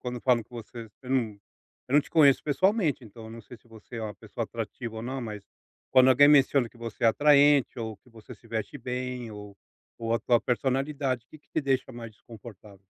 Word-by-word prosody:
quando 125 -1 -5
falam 125 -3 +2
que - - -28
você 115 0 -9
você 125 +4 -16
não 115 -6 -1 0.5
eu 130 - -2
num - - +7
te - - -13
conheço 145 -4 +5
pessoalmente, 165 - +1
então 115 +1 -12
eu 110 - -10
não 115 0 -9
sei 120 +3 -13
se 110 - -29
você 115 +1 -12
é 115 - -4
uma 105 -2 -5
pessoa - - -6
atrativa 115 -2 -6
ou 110 - -5
não, 130 +2 -4
mas 105 -3 -6 0.5
quando 130 0 +6
alguém 145 +3 +6
menciona 140 -3 +4
que 120 - -22
você 115 -2 -8
é 115 - +5
atraente, 145 +1 +4
ou 110 -1 -5
que 110 - -26
você 115 0 -13
se 115 0 -16
veste 115 +5 -4
bem 125 -1 -5
ou 105 -1 -10 0.4
ou 115 0 -1
a - - +1
sua 120 -2 +2
personalidade, 135 +1 -1
o - - -74
que 155 - -14
que - - -38
te - - 0
deixa 135 -2 -1
mais 115 -1 -8
desconfortável? 105 -3 -14
120 Hz, 225 wpm, -27 LUFS, 110-135 Hz, 0.5 s, num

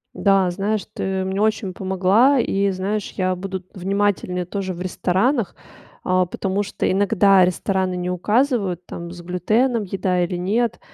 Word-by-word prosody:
Да, 195 -3 +3
знаешь, 200 +2 -1
ты 190 0 -2
мне 190 +2 -2
очень 215 -3 0
помогла. 195 +9 +3
И, 200 -3 +1
знаешь, 195 +2 -3
я 185 -1 0
буду 190 0 -5
внимательнее 190 -1 -1
тоже 190 0 -4
в 175 - -8
ресторанах, 190 +5 0 0.5
а, 185 0 +2
потому 195 +3 -2
что 205 - -2
иногда 195 -1 +4
рестораны 185 0 -1
не 180 0 -3
указывают, 200 - 0
там, 170 0 -7
с 175 -1 -9
глютеном 215 +7 +1
еда 185 -2 0
или 175 +1 -2
нет, 215 +6 0
190 Hz, 150 wpm, -21 LUFS, 180-205 Hz, 0.5 s, иногда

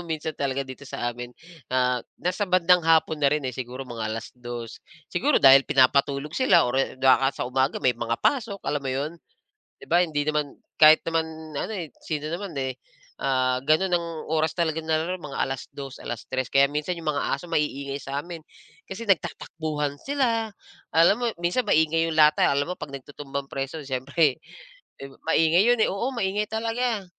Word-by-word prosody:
minsan 160 -1 -3
talaga 140 -2 -2
dito 130 +2 -10
sa 120 -1 -2
amin, 120 0 -8 0.4
ah, 125 -1 +2 0.2
nasa 185 +2 -2
bandang 180 0 +4
hapon 160 -1 +3
na 140 - +5
rin, 150 0 -1
eh, 130 - -2
siguro 130 +1 -6
mga 115 -3 -5
2:00. 120 +1 -7 0.3
Siguro - - +2
dahil 135 0 +8
pinapatulog 140 +1 +2
sila 260 +7 +4
or, 125 +1 -1
eh, 135 - -3
baka 135 +1 +4
sa - - -3
umaga 130 +2 +1
may 125 - +4
mga 115 0 -2
pasok, 225 -8 0
alam 145 -1 -1
mo 135 - -2
'yon. 140 +5 -2 0.7
'Di - - -11
ba, 175 - +5
hindi 150 -3 -2
naman 150 -2 -1 0.2
kahit 155 0 +8
naman 165 -1 0 0.3
ano, 220 - -3
eh, 165 -7 -5 0.2
sino 155 -1 -3
naman, 180 -1 -5
eh, 130 -1 -3 0.4
ah, 130 -1 +1
ganun 160 +5 +3
ang 170 -1 0 0.2
oras 160 0 +1
talaga 160 -2 0
nila, 160 +3 -1
mga 150 -4 -7
2:00, 135 0 -7
3:00, 130 +2 -4
kaya 140 0 +5
minsan 150 +5 -2
yung 155 -2 -1
mga 145 - -1
aso, 160 +6 -8
maiingay 140 -3 -1
sa 140 +1 -4
amin 170 -2 -9 0.5
kasi 210 +4 -7
nagtatakbuhan 155 -5 -1
sila, 235 -6 0 0.4
alam 170 +6 +6
mo 245 - -1
minsan 175 +9 0
maingay 160 +1 +3
yung 160 - -3
lata, 150 0 +6
alam 140 +1 +1
mo 180 - -2
'pag 140 - -7
nagtutumbang 140 0 -6
preso 135 +3 -4
siyempre, 135 +2 0 0.6
eh, 135 0 -8 0.2
maingay 165 +4 +4
yun, 245 -1 +4
eh, - - +3
oo, 230 +7 -2
maingay 210 -1 -1
talaga, 225 -1 -1
150 Hz, 175 wpm, -25 LUFS, 135-170 Hz, 0.7 s, dahil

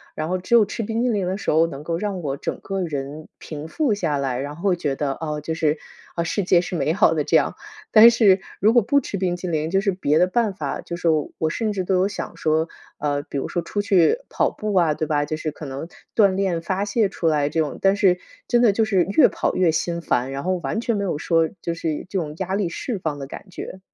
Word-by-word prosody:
然 155 +1 -3
后 185 - 0
只 185 +6 +1
有 220 -3 +6
吃 225 - -4
冰 225 +2 -2
淇 250 - +2
淋 200 -5 0
的 190 +2 -1
时 - - -1
候 160 +2 +4
能 140 -3 -8
够 165 +1 -2
让 195 -1 -3
我 140 -3 -3
整 - - -4
个 195 -1 -3
人 150 -1 -5
平 155 0 -7
复 255 - 0
下 165 -7 -1
来， 135 -3 -1
然 145 +2 -5
后 185 +4 +1
觉 145 -5 -2
得， 140 0 -1
啊， 150 0 -4
就 160 +2 -3
是， 155 -1 +1 0.4
啊， 170 - 0
世 190 +4 -1
界 175 -1 +4
是 180 +1 -5
美 155 +2 +1
好 175 - +4
的 155 -2 0
这 - - +1
样。 - - 0 0.4
但 225 +2 +9
是 210 -5 +4 0.2
如 215 - +4
果 240 - +6
不 280 +7 +2
吃 205 - -4
冰 180 -2 0
淇 180 - -5
淋 155 -2 -1
就 195 +1 +3
是 200 - +1
别 155 -5 +1
的 180 - +4
办 215 +1 +1
法， - - -4
就 170 - -6
是 175 - -10
说 155 -3 +1
我 160 - 0
甚 215 +6 -1
至 190 -2 -2
都 190 +1 +1
有 185 +1 +3
想 205 - -6
说， 160 +1 +1 0.3
呃， 145 -1 0
比 145 - -6
如 - - -2
说 175 - -1
出 205 +5 -2
去 195 - +3
跑 - - +1
步 215 -1 -4
啊， 170 -4 +4
对 155 - -3
吧， 145 -1 +1
就 155 - -3
是 155 -1 -3
可 150 0 -9
能 135 +4 -6 0.3
锻 200 -4 +4
炼 190 -4 0
发 190 +4 -1
泄 205 -1 +1
出 165 - -2
来 150 -2 +2
这 160 - -1
种， 150 -2 -1
但 195 0 +4
是 185 -3 +3 0.3
真 240 -1 +3
的 235 -4 +6
就 220 +3 +1
是 195 -5 +3
越 200 - +5
跑 - - -1
越 180 -3 +3
心 170 +1 -1
烦， 130 -4 0
然 140 +1 -4
后 185 0 +1
完 135 +10 -1
全 235 -1 0
没 200 - -1
有 180 -6 -1
说 165 +1 +2
就 170 - -2
是 165 -2 -3
这 195 - -2
种 150 -3 -4
压 190 0 -2
力 200 -4 0
释 225 +6 -4
放 155 -4 -3
的 135 - -6
感 190 - -10
觉。 185 +1 -8
175 Hz, 290 characters per minute, -22 LUFS, 155-200 Hz, 0.4 s, 但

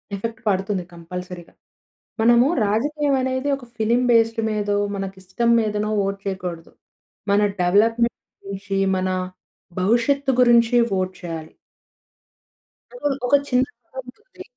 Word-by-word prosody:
Effect 225 +3 -5
పడుతుంది 190 -1 0
కంపల్సరీగా. 175 +1 -8 0.7
మనము 235 +2 +5 0.2
రాజకీయం 285 +7 0
అనేది 260 +2 -1
ఒక 270 - -12
ఫిల్మ్ 235 +3 +1
బేస్డ్ 225 0 +3
మీదో, 205 -1 -1 0.2
మనకి 195 -1 -5
ఇష్టం 235 +6 0
మీదనో 210 -1 -1
వోట్ 195 0 -2
చేయకూడదు. 180 -4 -5 0.6
మన 200 +1 +4 0.2
డెవలప్మెంట్ 225 +6 +2 0.3
గురించి, 195 0 -4 0.2
మన 185 0 -1 0.7
భవిష్యత్తు 240 +8 +2
గురించి 240 -1 +5 0.2
వోట్ 185 -1 -1
చేయాలి. 165 -2 -7 1.5
ఒక, - - -10 0.2
ఒక 285 - +5
చిన్న 250 -1 +3
ఎక్సాంపుల్ 250 - -11
ఉంది. 400 -6 -13
215 Hz, 115 wpm, -22 LUFS, 190-240 Hz, 1.5 s, మనము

